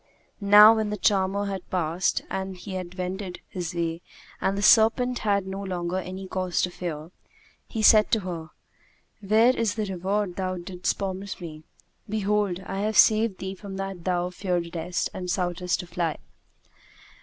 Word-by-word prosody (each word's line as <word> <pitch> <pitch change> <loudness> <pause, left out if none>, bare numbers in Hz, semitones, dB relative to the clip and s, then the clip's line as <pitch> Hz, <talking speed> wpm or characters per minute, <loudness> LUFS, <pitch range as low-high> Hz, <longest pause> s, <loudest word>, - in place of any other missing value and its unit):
Now 210 +1 +8
when 215 -1 0
the 210 - -3
charmer 195 0 +1
had 195 -2 -5
passed 175 0 0
and 190 -1 -4
had 185 -1 -7
wended 185 0 -4
his 175 -1 -5
way 165 0 -2 0.4
and 195 +1 0
the 200 - -2
serpent 240 +3 +5
had 200 -2 +1
no 190 +1 -5
longer 180 -2 -3
any 190 +1 -7
cause 185 -1 -2
to 180 - 0
fear, 165 -2 -6 0.6
he 220 -2 -3
said 215 0 +7
to 220 - +3
her, 170 -4 -6 0.7
'Where 220 +5 +4
is 225 -2 0
the 215 -2 -1
reward 195 0 -2
thou 185 -1 -2
didst 180 +1 -3
promise 195 0 -4
me? 160 -3 -8 0.5
Behold, 205 -3 0
I 195 0 -5
have 215 +2 0
saved 220 -3 +5
thee 190 0 -5
from 195 0 -8
that 195 -3 -5
thou 180 0 0
fearedest 175 -2 -2
and 180 -1 -5
soughtest 180 -1 -1
to - - -10
fly.' 170 -2 -2
190 Hz, 160 wpm, -26 LUFS, 180-205 Hz, 0.7 s, Now